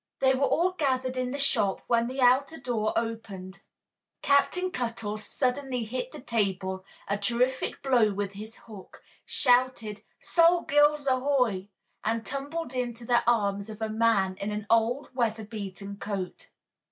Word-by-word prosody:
They 265 Hz, 0 st, +4 dB
were 275 Hz, +1 st, +2 dB
all 360 Hz, +2 st, +2 dB
gathered 260 Hz, -6 st, 0 dB
in 255 Hz, -1 st, -1 dB
the 275 Hz, -, -3 dB
shop 205 Hz, -8 st, +1 dB
when 235 Hz, 0 st, +2 dB
the 260 Hz, +2 st, -3 dB
outer 265 Hz, +6 st, +4 dB
door 235 Hz, -5 st, -1 dB
opened. 200 Hz, -5 st, -4 dB, 0.6 s
Captain 360 Hz, +6 st, +3 dB
Cuttle 230 Hz, -5 st, -3 dB
suddenly 250 Hz, +2 st, -1 dB
hit 250 Hz, +3 st, -4 dB
the -, -, -9 dB
table 190 Hz, -6 st, -1 dB, 0.2 s
a 200 Hz, +1 st, -1 dB
terrific 245 Hz, +5 st, 0 dB
blow 245 Hz, -6 st, +4 dB
with 200 Hz, 0 st, -3 dB
his 215 Hz, +3 st, -9 dB
hook, 210 Hz, -5 st, -12 dB, 0.2 s
shouted 245 Hz, -5 st, +2 dB, 0.2 s
"Sol 340 Hz, 0 st, +4 dB
Gills, 295 Hz, 0 st, +3 dB
ahoy!" 255 Hz, -7 st, +1 dB, 0.4 s
and 225 Hz, +1 st, -1 dB
tumbled 280 Hz, +1 st, -4 dB
into 240 Hz, -2 st, -3 dB
the 240 Hz, 0 st, +3 dB
arms 200 Hz, -3 st, +1 dB
of 215 Hz, 0 st, -8 dB
a 220 Hz, -1 st, -2 dB
man 215 Hz, -4 st, +2 dB
in 200 Hz, -, -3 dB
an 210 Hz, 0 st, -4 dB
old, 230 Hz, +5 st, +2 dB
weather 225 Hz, -3 st, -1 dB
beaten 200 Hz, -2 st, -7 dB
coat. 200 Hz, -3 st, -5 dB
235 Hz, 150 wpm, -28 LUFS, 210-260 Hz, 0.6 s, They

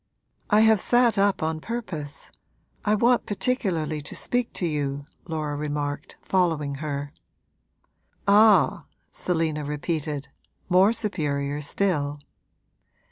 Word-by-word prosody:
'I 210 Hz, +1 st, +5 dB
have 220 Hz, -1 st, +5 dB
sat 240 Hz, 0 st, +3 dB
up 200 Hz, -4 st, +2 dB
on 160 Hz, 0 st, -1 dB
purpose 170 Hz, -9 st, -6 dB, 0.5 s
I 210 Hz, 0 st, +2 dB
want 240 Hz, +3 st, +3 dB
particularly 190 Hz, -, -1 dB
to 145 Hz, -, -9 dB
speak 245 Hz, -1 st, -1 dB
to 180 Hz, -, -1 dB
you,' 145 Hz, -3 st, -2 dB, 0.2 s
Laura 155 Hz, -3 st, -3 dB
remarked, 145 Hz, -1 st, -4 dB
following 160 Hz, -6 st, +1 dB
her. 145 Hz, -1 st, -4 dB, 1.1 s
'Ah!' 200 Hz, -7 st, +5 dB, 0.3 s
Selina 160 Hz, -4 st, -1 dB
repeated, 150 Hz, -1 st, -3 dB, 0.4 s
more 185 Hz, +3 st, +5 dB
superior 150 Hz, -10 st, -2 dB
still. 145 Hz, -3 st, -1 dB
160 Hz, 105 wpm, -25 LUFS, 145-205 Hz, 1.1 s, I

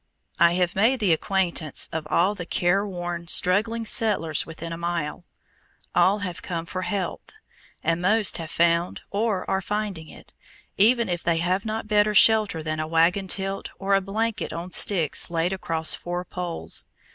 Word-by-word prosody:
I 170 Hz, 0 st, +5 dB
have 180 Hz, 0 st, 0 dB
made 230 Hz, +7 st, +3 dB
the 200 Hz, -6 st, +3 dB
acquaintance 170 Hz, -3 st, -1 dB
of 160 Hz, -1 st, -4 dB
all 180 Hz, +6 st, +2 dB
the 180 Hz, -4 st, -7 dB
careworn, 175 Hz, -2 st, -1 dB
struggling 220 Hz, +7 st, +2 dB
settlers 195 Hz, -9 st, 0 dB
within 165 Hz, +1 st, -7 dB
a -, -, -5 dB
walk. 170 Hz, -2 st, -3 dB, 0.7 s
All 200 Hz, +3 st, +3 dB
have 175 Hz, -2 st, -6 dB
come 170 Hz, -2 st, -4 dB
for 185 Hz, +2 st, -5 dB
health, 185 Hz, -, -4 dB, 0.5 s
and 165 Hz, +1 st, 0 dB
most 210 Hz, +3 st, +3 dB
have 165 Hz, -2 st, -6 dB
found 170 Hz, +1 st, +1 dB
or 205 Hz, -2 st, -1 dB
are 190 Hz, -, 0 dB
finding 200 Hz, -5 st, -4 dB
it, -, -, -14 dB, 0.4 s
even 235 Hz, +3 st, +4 dB
if 175 Hz, -2 st, -2 dB
they 170 Hz, -1 st, +1 dB
have 185 Hz, +4 st, 0 dB
not 220 Hz, 0 st, -3 dB
better 210 Hz, 0 st, +2 dB
shelter 210 Hz, -7 st, +4 dB
than 155 Hz, 0 st, -3 dB
a 155 Hz, -, -2 dB
wagon 170 Hz, +4 st, +2 dB
tilt 195 Hz, +1 st, -2 dB
or 195 Hz, 0 st, -1 dB
a 195 Hz, -, +4 dB
blanket 215 Hz, +3 st, -2 dB
on 170 Hz, +2 st, -6 dB
sticks 170 Hz, -5 st, +1 dB
laid 170 Hz, +2 st, 0 dB
across 165 Hz, -4 st, 0 dB
four 175 Hz, +1 st, -4 dB
poles. 175 Hz, -, -5 dB
180 Hz, 165 wpm, -24 LUFS, 170-205 Hz, 0.7 s, I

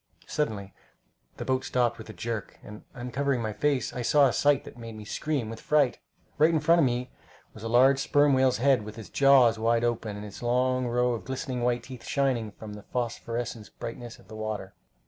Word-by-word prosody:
Suddenly 100 Hz, -10 st, -3 dB, 0.6 s
the -, -, -5 dB
boat 130 Hz, 0 st, 0 dB
stopped 125 Hz, -3 st, 0 dB
with 110 Hz, -, -10 dB
a -, -, -5 dB
jerk, 110 Hz, +2 st, -5 dB
and 105 Hz, 0 st, -10 dB
uncovering 125 Hz, +2 st, -1 dB
my 110 Hz, -2 st, -3 dB
face, 145 Hz, +2 st, 0 dB
I 125 Hz, -, -4 dB
saw 145 Hz, +4 st, +5 dB
a 130 Hz, -, +2 dB
sight 145 Hz, -1 st, +3 dB
that -, -, -11 dB
made 115 Hz, -2 st, -9 dB
me 105 Hz, -1 st, -9 dB
scream 145 Hz, -1 st, -2 dB
with 115 Hz, +1 st, -7 dB
fright. 145 Hz, -4 st, +2 dB, 0.4 s
Right 155 Hz, +2 st, +6 dB
in 165 Hz, -2 st, +2 dB
front 165 Hz, +3 st, +4 dB
of 155 Hz, -, +5 dB
me 125 Hz, 0 st, -1 dB, 0.4 s
was 110 Hz, -, -12 dB
a 115 Hz, -, -4 dB
large 130 Hz, +3 st, +5 dB
sperm 145 Hz, +1 st, +3 dB
whale's 130 Hz, -1 st, +3 dB
head, 130 Hz, -1 st, +3 dB
with 105 Hz, +1 st, -9 dB
its 110 Hz, -, -9 dB
jaws 130 Hz, -5 st, +5 dB
wide 115 Hz, +1 st, +2 dB
open, 115 Hz, -3 st, -1 dB
and 105 Hz, -, -7 dB
its 100 Hz, -1 st, -10 dB
long 125 Hz, +1 st, +1 dB
row 125 Hz, +1 st, +1 dB
of 115 Hz, -, -4 dB
white, -, -, -18 dB
glistening 125 Hz, -2 st, -1 dB
teeth 125 Hz, 0 st, -10 dB
shining 130 Hz, -6 st, 0 dB
from 105 Hz, +1 st, -10 dB
the 105 Hz, -, -9 dB
phosphorescent 120 Hz, -2 st, -3 dB
brightness 120 Hz, 0 st, -7 dB
of -, -, -20 dB
the 110 Hz, -, -10 dB
water. 110 Hz, -3 st, -5 dB
120 Hz, 210 wpm, -27 LUFS, 110-130 Hz, 0.6 s, Right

